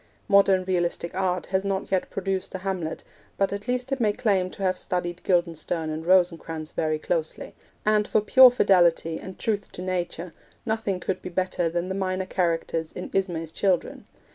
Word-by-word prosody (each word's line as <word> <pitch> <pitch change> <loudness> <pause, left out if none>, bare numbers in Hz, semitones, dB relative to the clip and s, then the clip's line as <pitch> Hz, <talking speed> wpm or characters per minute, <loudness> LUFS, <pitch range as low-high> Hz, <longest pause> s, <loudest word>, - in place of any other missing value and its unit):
Modern 195 -2 +5
realistic 175 -2 -1
art 185 -1 -1
has 190 0 +2
not 195 -1 -2
yet 190 -1 0
produced 195 -1 -3
a 190 +1 -7
Hamlet, 180 -5 -3 0.3
but 195 0 +1
at 200 0 -6
least 250 +1 -2
it 270 - 0
may 215 -3 +2
claim 195 -5 +1
to 195 - -8
have 185 -1 +1
studied 175 -1 -3
Guildenstern 170 -2 0
and 160 +2 -5
Rosencrantz 165 -3 +2
very 155 -1 0
closely; 160 0 -3 0.3
and, 210 0 +3
for - - +3
pure 255 +5 +8
fidelity 175 -8 +3
and 185 - -9
truth 205 -3 -2
to - - -7
nature, 180 -2 -3 0.3
nothing 220 -4 -1
could 185 +1 -3
be - - -6
better 180 -1 0
than 175 +2 -2
the 190 - -3
minor 190 -1 -1
characters 165 -3 -1
in 180 - -7
Ismay's 170 -4 -1
Children. 185 0 -1
185 Hz, 175 wpm, -25 LUFS, 170-195 Hz, 0.3 s, pure